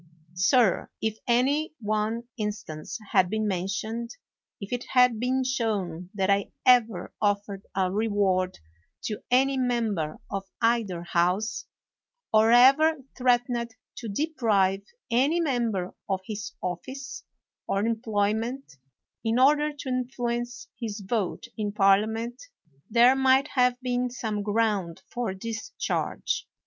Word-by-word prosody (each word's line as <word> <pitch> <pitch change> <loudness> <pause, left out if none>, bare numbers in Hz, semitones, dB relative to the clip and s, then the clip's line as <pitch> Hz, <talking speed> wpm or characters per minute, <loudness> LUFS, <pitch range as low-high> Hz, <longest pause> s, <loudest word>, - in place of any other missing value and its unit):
Sir, 195 +3 +3
if 220 0 -2
any 280 +6 +2
one 215 +1 -1
instance 210 -8 -5
had 180 -1 +4
been 215 +1 -1
mentioned, 200 +5 -2 0.5
if 200 +3 -6
it 245 - -2
had 250 -3 +5
been 260 +2 +1
shown 200 -9 -2
that 190 -2 +1
I 200 0 +1
ever 230 -7 +3
offered 200 -1 -1
a 185 -1 +1
reward 195 -3 +1 0.5
to 210 - -4
any 265 +2 +3
member 225 -11 0
of 195 0 -3
either 225 -7 +1
House, 180 +6 0 0.7
or 220 +1 +5
ever 275 +7 +6 0.2
threatened 245 -2 +1 0.2
to 235 - -6
deprive 205 -7 +1 0.3
any 275 +8 +3
member 235 - -1 0.2
of 190 -1 0
his 210 -1 -5
office 255 +10 -5 0.4
or 200 +2 0
employ 220 -3 +1
ment, 235 - -5 0.5
in 225 +1 +1
order 295 +3 +4
to 290 -2 -7
influence 245 -1 -3
his 215 -3 -5
vote 205 -2 -2
in 205 -1 -2
Parliament, 220 +5 +2 0.5
there 240 +3 +6
might 265 +1 +4
have 250 -1 +2
been 250 0 0
some 220 -4 -3
ground 205 -4 0
for 235 -6 -2
this 225 +3 -6 0.2
?harge. - - -1
225 Hz, 125 wpm, -27 LUFS, 200-250 Hz, 0.7 s, ever